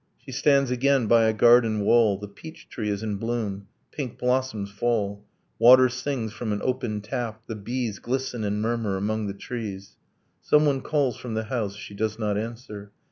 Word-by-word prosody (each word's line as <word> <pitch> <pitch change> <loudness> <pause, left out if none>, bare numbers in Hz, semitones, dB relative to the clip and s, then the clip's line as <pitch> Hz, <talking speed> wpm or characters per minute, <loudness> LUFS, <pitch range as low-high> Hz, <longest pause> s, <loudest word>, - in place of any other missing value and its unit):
She 135 - -12
stands 140 0 +3
again 130 0 +2
by 115 0 +5
a 110 - +4
garden 115 -1 +4
wall, 110 -1 +4
The 105 +1 -8
peach 160 +11 -12
tree 105 -3 -3
is 100 +1 -2
in 105 -2 -2
bloom, 105 -3 -3 0.2
pink 135 -6 -5
blossoms 125 -5 -1
fall, 100 -2 -1 0.4
Water 130 +2 +8
sings 130 -3 -3
from 110 0 -4
an 105 - -1
opened 125 -5 -2
tap, 110 0 -4
the - - -5
bees 110 0 -3
Glisten 125 -2 -3
and 105 +1 -1
murmur 115 -4 -1
among 105 +2 -1
the 100 - -5
trees. 100 -3 -7 0.4
Someone 150 -3 +3
calls 140 -6 0
from 120 -3 -6
the 110 - -1
house. 110 -3 -3
She 105 - -9
does 110 +1 -2
not 105 -2 -1
answer. 110 -2 -6
115 Hz, 180 wpm, -25 LUFS, 105-125 Hz, 0.4 s, Water